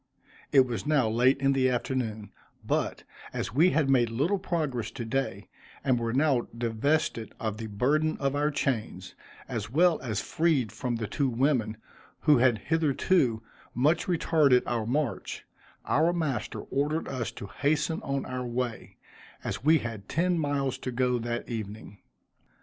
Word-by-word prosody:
It 135 Hz, -, +7 dB
was 120 Hz, +2 st, -4 dB
now 145 Hz, -6 st, +3 dB
late 125 Hz, +5 st, +3 dB
in 135 Hz, 0 st, +3 dB
the 130 Hz, -1 st, +3 dB
afternoon; 115 Hz, -5 st, -2 dB, 0.3 s
but, -, -, -1 dB, 0.3 s
as -, -, -3 dB
we 165 Hz, +8 st, +5 dB
had 155 Hz, -5 st, +2 dB
made 125 Hz, -4 st, +3 dB
little 150 Hz, -, 0 dB
progress 150 Hz, -, -2 dB
to 115 Hz, +1 st, -6 dB
day, 110 Hz, -5 st, -2 dB, 0.4 s
and 130 Hz, -3 st, +2 dB
were 115 Hz, -1 st, -1 dB
now 135 Hz, -1 st, +2 dB
divested 115 Hz, +1 st, 0 dB
of 110 Hz, -2 st, -3 dB
the 110 Hz, 0 st, -5 dB
burden 145 Hz, +9 st, +1 dB
of 140 Hz, 0 st, -1 dB
our 145 Hz, +1 st, +2 dB
chains, 110 Hz, -10 st, -2 dB, 0.3 s
as -, -, -4 dB
well 165 Hz, +5 st, +3 dB
as 110 Hz, -6 st, -2 dB
freed 140 Hz, 0 st, +1 dB
from 120 Hz, +3 st, -3 dB
the 115 Hz, -1 st, -3 dB
two 135 Hz, +5 st, 0 dB
women, 120 Hz, -3 st, +1 dB, 0.4 s
who 150 Hz, -4 st, +5 dB
had 120 Hz, -2 st, +4 dB
hitherto 145 Hz, -, +1 dB, 0.3 s
much 150 Hz, +7 st, +2 dB
retarded 155 Hz, -7 st, +3 dB
our 115 Hz, -2 st, -1 dB
march, 140 Hz, +1 st, -2 dB, 0.4 s
our 165 Hz, +4 st, +3 dB
master 155 Hz, -7 st, -2 dB
ordered 150 Hz, +4 st, -1 dB
us 125 Hz, -4 st, -3 dB
to -, -, -8 dB
hasten 150 Hz, +8 st, 0 dB
on 140 Hz, 0 st, -2 dB
our 130 Hz, 0 st, -4 dB
way, 120 Hz, -1 st, -4 dB, 0.5 s
as -, -, -4 dB
we 160 Hz, +3 st, +6 dB
had 115 Hz, -7 st, -6 dB
ten 175 Hz, +1 st, +1 dB
miles 140 Hz, -3 st, -1 dB
to 130 Hz, -, -4 dB
go 125 Hz, 0 st, +1 dB
that 120 Hz, +1 st, -3 dB
evening. 105 Hz, -2 st, -6 dB
130 Hz, 155 wpm, -28 LUFS, 115-150 Hz, 0.5 s, It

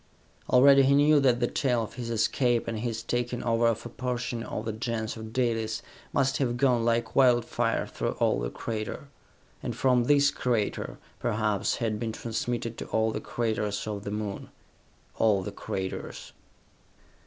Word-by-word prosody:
Already 135 Hz, +2 st, +7 dB
he 135 Hz, +1 st, +4 dB
knew 145 Hz, +1 st, +5 dB
that 125 Hz, -3 st, +3 dB
the 120 Hz, -, +2 dB
tale 125 Hz, -4 st, +1 dB
of 110 Hz, -, -8 dB
his 120 Hz, -2 st, -5 dB
escape, 120 Hz, +1 st, +1 dB
and 115 Hz, -2 st, -2 dB
his 115 Hz, -1 st, -3 dB
taking 120 Hz, +1 st, -2 dB
over 115 Hz, 0 st, +2 dB
of 115 Hz, 0 st, -1 dB
a -, -, -5 dB
portion 120 Hz, -1 st, -3 dB
of 110 Hz, -1 st, -5 dB
the 110 Hz, -, -1 dB
Gens 110 Hz, -1 st, -3 dB
of 110 Hz, -1 st, -8 dB
Dalis, 115 Hz, -2 st, -1 dB, 0.3 s
must 135 Hz, -1 st, +1 dB
have 120 Hz, -3 st, 0 dB
gone 125 Hz, -3 st, +3 dB
like 115 Hz, 0 st, 0 dB
wildfire 125 Hz, -3 st, +3 dB
through -, -, -3 dB
all -, -, +1 dB
the -, -, -2 dB
crater, 110 Hz, -, -5 dB, 0.5 s
and -, -, -4 dB
from 125 Hz, -2 st, +3 dB
this 145 Hz, +1 st, +4 dB
crater, 120 Hz, -6 st, -1 dB, 0.2 s
perhaps, 105 Hz, -3 st, 0 dB
had 110 Hz, -2 st, -2 dB
been 115 Hz, -1 st, -3 dB
transmitted 115 Hz, +1 st, -3 dB
to -, -, -5 dB
all 110 Hz, 0 st, +1 dB
the -, -, -4 dB
craters 105 Hz, -3 st, -2 dB
of 105 Hz, -2 st, -4 dB
the 100 Hz, -, -4 dB
Moon. 105 Hz, -1 st, -4 dB, 0.7 s
All 105 Hz, -4 st, +3 dB
the -, -, -5 dB
craters.... 95 Hz, -1 st, -5 dB
115 Hz, 165 wpm, -28 LUFS, 110-125 Hz, 0.7 s, Already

